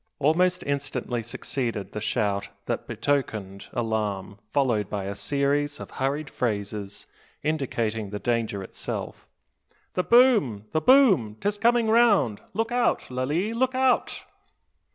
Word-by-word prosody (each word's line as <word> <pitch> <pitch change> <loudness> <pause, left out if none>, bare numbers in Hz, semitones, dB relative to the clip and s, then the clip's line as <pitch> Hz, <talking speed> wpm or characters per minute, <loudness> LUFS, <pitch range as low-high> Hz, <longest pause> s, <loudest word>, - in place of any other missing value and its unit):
Almost 180 +5 +2
instantly 140 -4 -2
succeeded 115 -2 -4
the 105 - -5
shout 100 -2 0 0.2
that - - -3
betokened 110 -9 -2
alarm, 105 -4 -2
followed 120 -8 +1
by 100 -2 -3
a 100 +1 -3
series 145 +5 0
of - - -8
hurried 140 +3 -2
phrases, 105 -4 -3 0.4
indicating 115 -8 -1
the 105 - -4
danger 115 -3 -1
itself. - - -6 0.7
"The 180 - +1
boom, 215 - +4
the 155 - +1
boom! 190 - +5
'Tis 205 0 -1
coming 235 0 +3
round! 220 - +4
Look 225 +2 -1
out, 245 - +1
Lalee! 150 - -1
look 255 +2 0
out!" 260 -1 +1
135 Hz, 125 wpm, -26 LUFS, -, 0.7 s, boom